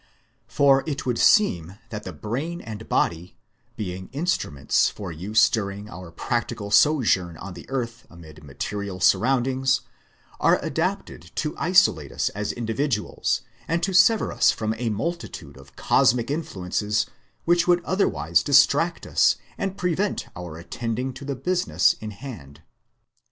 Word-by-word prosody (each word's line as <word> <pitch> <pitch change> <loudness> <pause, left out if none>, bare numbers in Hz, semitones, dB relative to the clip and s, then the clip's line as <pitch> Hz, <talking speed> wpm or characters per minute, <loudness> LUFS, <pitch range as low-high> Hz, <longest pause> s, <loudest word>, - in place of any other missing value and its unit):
For 135 -1 +4
it 145 -3 -3
would 125 -2 -1
seem 95 - +3
that 105 -2 -6
the 95 - -5
brain 125 - -4
and 110 -4 -9
body, 85 +2 -1 0.4
being 95 -2 -5
instruments 145 - +1
for 95 -4 -7
use 100 +7 +3
during 100 -1 -4
our 90 -2 -9
practical 115 +3 -3
sojourn 105 - +3
on 95 +2 -8
the - - -12
earth 120 -3 -4
amid 80 -3 -14
material 95 +7 -5
surroundings, 130 +7 +2 0.6
are - - +4
adapted 85 - -3
to 150 -1 -2
isolate 165 - +3
us - - 0
as 105 +1 -3
individuals 115 0 -1 0.3
and 165 +1 -1
to 190 +1 0
sever 195 +5 +5
us - - +4
from 110 0 0
a 120 -2 -1
multitude 170 - -4
of 70 0 -16
cosmic 120 +3 +2
influences 105 - -1 0.4
which 175 0 +3
would 175 -1 +3
otherwise 85 - +1
distract 145 - +3
us - - +3 0.2
and 195 0 -3
prevent 180 +3 -1
our 90 -4 -7
attending 115 +9 -4
to 130 +3 -10
the 140 0 -3
business 180 +7 +2
in 110 - -5
hand. 100 - -10
115 Hz, 140 wpm, -24 LUFS, 95-145 Hz, 0.6 s, sever